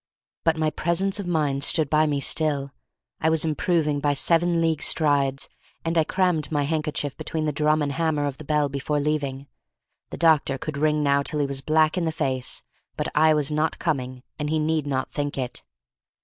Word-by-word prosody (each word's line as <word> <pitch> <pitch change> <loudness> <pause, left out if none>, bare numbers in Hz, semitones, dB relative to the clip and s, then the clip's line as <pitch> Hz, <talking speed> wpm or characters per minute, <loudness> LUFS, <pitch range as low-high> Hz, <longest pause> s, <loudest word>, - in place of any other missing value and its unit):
But 160 -1 +2
my 155 -1 +1
presence 190 +6 0
of 195 - -4
mind 145 -5 0
stood 160 -1 +3
by 155 +2 +3
me 145 -2 0
still, 140 -1 +1 0.5
I 160 - +2
was 160 0 +2
improving 155 -1 0
by 145 0 +1
seven 170 +3 +3
league 165 -2 +1
strides, 140 -3 +2 0.4
and 165 +1 -1
I 160 - +4
crammed 180 -3 0
my 145 -2 +1
handkerchief 150 -2 -2
between 160 -1 -3
the 150 - 0
drum 150 +1 +1
and 145 - -1
hammer 155 -1 0
of 140 -2 -4
the - - -8
bell 150 0 +1
before 140 +2 -2
leaving. 140 -2 -2 0.6
The - - -7
doctor 155 -5 +3
could 155 +2 -5
ring 150 0 +2
now 140 0 +3
till 150 +1 -1
he 145 - +2
was 140 -1 -3
black 155 +4 +2
in 170 - -1
the 160 - 0
face, 135 -5 -2 0.3
but - - -2
I 155 +1 +4
was 150 -1 +1
not 155 +1 0
coming, 130 -6 -3 0.2
and 150 0 -2
he 160 - +1
need 155 -1 0
not 130 -2 -2
think 145 -1 -3
it. 125 -2 -3
150 Hz, 200 wpm, -24 LUFS, 140-160 Hz, 0.6 s, I